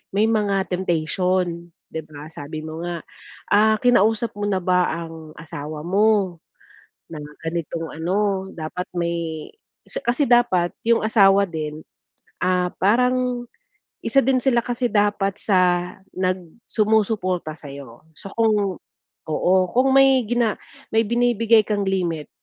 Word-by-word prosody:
may 210 - +4
mga 200 -3 +1
temptation, 175 0 -1 0.2
'di 160 - -4
ba, 145 0 -10
sabi 155 +2 -7
mo 160 +1 -6
nga. 175 -1 -4 0.5
Ah, 215 +1 +4
kinausap 230 -2 +3
mo 205 - -2
na 195 - +1
ba 180 0 +2
ang 165 -1 -7
asawa 150 -1 -7
mo, 195 -2 +2 0.7
na 155 - -6 0.2
ganitong 165 0 -3
ano 190 +4 -1
dapat 165 +3 -5
may 170 -2 -3 0.4
'si - - -4
kasi 245 +5 +1
dapat 230 -8 +3
yung 230 0 +3
asawa 200 -2 +5
din, 155 -2 -5 0.6
ah, 180 -1 +2
parang 250 +3 +1 0.6
isa 275 - +4
din 265 0 +3
sila 245 -2 +2
kasi 245 0 -1
dapat 205 -2 +1
sa 180 -2 +2 0.3
nag 185 0 +1 0.3
sumusuporta 210 -6 +1
sa'yo. 140 -5 -11
So, 195 - -9
kung, 210 -4 +2 0.5
oo, 175 +4 +2 0.2
kung 255 +2 +3
may 270 -1 +6
gina 240 -2 +1 0.4
may 225 0 +4
binibigay 230 -2 +3
kang 205 -2 0
limit 170 -5 -1
190 Hz, 130 wpm, -22 LUFS, 170-220 Hz, 0.7 s, may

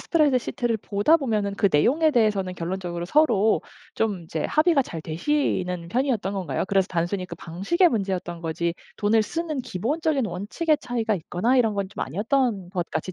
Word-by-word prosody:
스프레드시트를 255 -6 +1
보다 205 +10 +2
보면은 215 -8 -1
그 200 - +3
내용에 285 - +3
대해서는 210 -7 +1
결론적으로 175 0 -4
서로 220 - +3 0.3
좀 205 -6 -1
이제 160 -1 -4
합의가 310 -2 +3
잘 165 -9 -7
되시는 180 - -1
편이었던 235 -3 0
건가요? 180 -9 -2
그래서 195 -1 +2
단순히 180 +2 -1
그 170 - -8
방식의 195 - +1
문제였던 190 - -2
거지 170 +1 -2 0.2
돈을 215 +1 +3
쓰는 315 +3 -3
기본적인 270 - -1
원칙의 220 - -1
차이가 230 -3 -1
있거나 185 +8 0
이런 225 -4 +3
건 200 - 0
좀 - - -7
아니었던 205 - 0
것 180 -3 -3
같이 160 +4 -3
205 Hz, 400 characters per minute, -24 LUFS, 180-260 Hz, 0.3 s, 그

